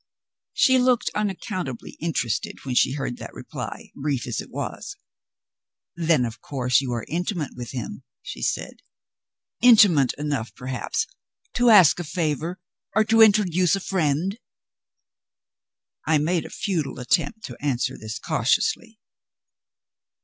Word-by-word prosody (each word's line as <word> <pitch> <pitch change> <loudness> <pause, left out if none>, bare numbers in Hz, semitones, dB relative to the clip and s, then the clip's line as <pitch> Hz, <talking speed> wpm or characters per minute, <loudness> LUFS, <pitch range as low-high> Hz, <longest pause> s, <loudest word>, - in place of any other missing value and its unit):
She 260 -1 +5
looked 250 -1 +2
unaccountably 190 - -3
interested 140 -10 -2
when 130 - -2
she 125 - +3
heard 135 -4 -4
that - - -9
reply, - - -7
brief 135 -3 -2
as 120 -3 -3
it - - -12
was. - - -6 1.0
"Then, 160 -6 +2
of 115 +1 -7
course, 125 -2 +1
you 130 -2 -4
are 120 - -3
intimate 175 - -2
with 120 -1 -7
him," 125 -4 -6 0.2
she - - -8
said. - - -3 0.8
"Intimate 205 - +6
enough, 145 -6 -3
perhaps, 125 -2 -3 0.5
to 245 0 +3
ask 190 -7 +7
a - - -2
favor 165 +2 -2 0.4
or 220 - +5
to 225 +1 +4
introduce 190 -5 +4
a - - -3
friend?" 185 - -1 1.7
I 160 - +4
made 165 +3 0
a - - -13
futile 165 -10 -3
attempt 140 - 0
to 125 - -9
answer 130 -2 0
this 110 +2 -6
cautiously. 220 - 0
155 Hz, 130 wpm, -24 LUFS, 130-195 Hz, 1.7 s, ask